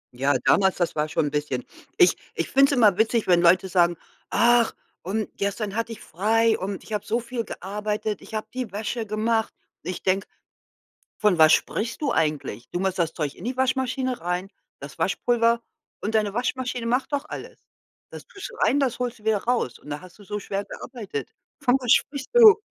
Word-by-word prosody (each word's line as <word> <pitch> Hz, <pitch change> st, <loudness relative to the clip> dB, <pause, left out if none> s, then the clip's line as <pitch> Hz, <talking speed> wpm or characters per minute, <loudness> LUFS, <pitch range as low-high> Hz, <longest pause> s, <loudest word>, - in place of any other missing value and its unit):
Ja, 135 Hz, +2 st, +2 dB
damals, 190 Hz, -1 st, +4 dB
das 175 Hz, -3 st, -1 dB
war 150 Hz, 0 st, 0 dB
schon 155 Hz, -, +1 dB
'n 145 Hz, -, -2 dB
bisschen 145 Hz, -4 st, -2 dB, 0.3 s
ich 175 Hz, -, +6 dB, 0.2 s
ich 165 Hz, -, -1 dB
finde 275 Hz, +1 st, +5 dB
es 275 Hz, -, +1 dB
immer 210 Hz, -5 st, +5 dB
witzig, 225 Hz, 0 st, +2 dB
wenn 175 Hz, -1 st, +5 dB
Leute 185 Hz, +2 st, +5 dB
sagen: 175 Hz, -2 st, +3 dB, 0.3 s
„Ach, 235 Hz, 0 st, +4 dB, 0.3 s
und 210 Hz, +4 st, -2 dB
gestern 200 Hz, +1 st, -2 dB
hatte 230 Hz, 0 st, -2 dB
ich 225 Hz, -, -8 dB
frei 220 Hz, +6 st, +2 dB
und 195 Hz, 0 st, -4 dB
ich 220 Hz, -, -9 dB
habe 210 Hz, -1 st, -1 dB
so 230 Hz, +3 st, 0 dB
viel 235 Hz, 0 st, -4 dB
gearbeitet. 210 Hz, +2 st, -4 dB
Ich 220 Hz, -, -9 dB
habe 215 Hz, -, -2 dB
die 255 Hz, -4 st, -4 dB
Wäsche 220 Hz, +2 st, -3 dB
gemacht.“ 220 Hz, +1 st, 0 dB, 0.3 s
Ich 185 Hz, -, -5 dB
denke: 190 Hz, +1 st, +1 dB, 0.9 s
„Von 205 Hz, -6 st, +3 dB
was 155 Hz, 0 st, +7 dB
sprichst 230 Hz, +7 st, 0 dB
du 285 Hz, -, +1 dB
eigentlich? 145 Hz, -7 st, -1 dB
Du 175 Hz, -, -2 dB
machst 190 Hz, -1 st, -1 dB
das 165 Hz, -2 st, +1 dB
Zeug 150 Hz, -3 st, -3 dB
in 180 Hz, -, -11 dB
die 250 Hz, +1 st, -3 dB
Waschmaschine 260 Hz, -1 st, 0 dB
rein, 180 Hz, +2 st, -2 dB, 0.3 s
das 140 Hz, +3 st, -10 dB
Waschpulver 230 Hz, +6 st, +2 dB, 0.4 s
und 220 Hz, +2 st, 0 dB
deine 210 Hz, -2 st, 0 dB
Waschmaschine 250 Hz, -1 st, -2 dB
macht 250 Hz, +5 st, 0 dB
doch 285 Hz, +1 st, -1 dB
alles. -, -, -8 dB, 0.5 s
Das -, -, -10 dB
tust 400 Hz, +5 st, -8 dB
rein, 285 Hz, -, +3 dB
das 255 Hz, -3 st, 0 dB
holst 245 Hz, -3 st, -3 dB
du -, -, -21 dB
wieder 220 Hz, -2 st, +2 dB
raus 235 Hz, -, 0 dB
und -, -, -17 dB
da 145 Hz, 0 st, -4 dB
hast 185 Hz, +2 st, -15 dB
du 205 Hz, -, -14 dB
so 210 Hz, +1 st, -4 dB
schwer 200 Hz, 0 st, -3 dB
gearbeitet? 210 Hz, -, -7 dB, 0.3 s
Von 255 Hz, -1 st, +4 dB
was 250 Hz, -1 st, +2 dB
sprichst 280 Hz, -2 st, +1 dB
du?“ 440 Hz, -3 st, +9 dB
210 Hz, 200 wpm, -24 LUFS, 180-240 Hz, 0.9 s, du